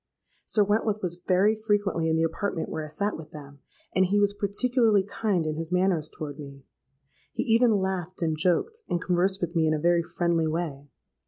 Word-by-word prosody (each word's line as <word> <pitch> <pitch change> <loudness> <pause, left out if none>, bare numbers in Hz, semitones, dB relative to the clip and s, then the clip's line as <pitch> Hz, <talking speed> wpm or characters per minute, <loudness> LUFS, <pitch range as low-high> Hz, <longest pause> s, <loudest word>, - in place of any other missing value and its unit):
Sir 210 - +3
Wentworth 210 0 0
was 175 0 -3
very 195 +4 +4
frequently 205 -6 0
in 160 - +2
the 160 - +2
apartment 165 +1 -2
where 155 - -4
I - - -6
sate 200 +8 -2
with 160 -1 -9
them; 145 -2 -11 0.3
and 185 +1 +3
he 205 +2 +2
was 205 0 +2
particularly 215 +1 +2
kind 200 -3 -1
in 155 0 -2
his 165 +1 -5
manners 180 -4 +1
toward 145 -1 -7
me. 140 -2 -10 0.7
He - - -1
even 230 +2 +4
laughed 185 -2 -3
and 160 -1 +1
joked, 185 - 0
and 175 - 0
conversed 185 +2 0
with 175 0 -3
me 160 -1 +3
in 155 - +2
a - - -2
very 170 +2 +3
friendly 170 -1 0
way. 155 -3 -4
180 Hz, 195 wpm, -26 LUFS, 160-205 Hz, 0.7 s, very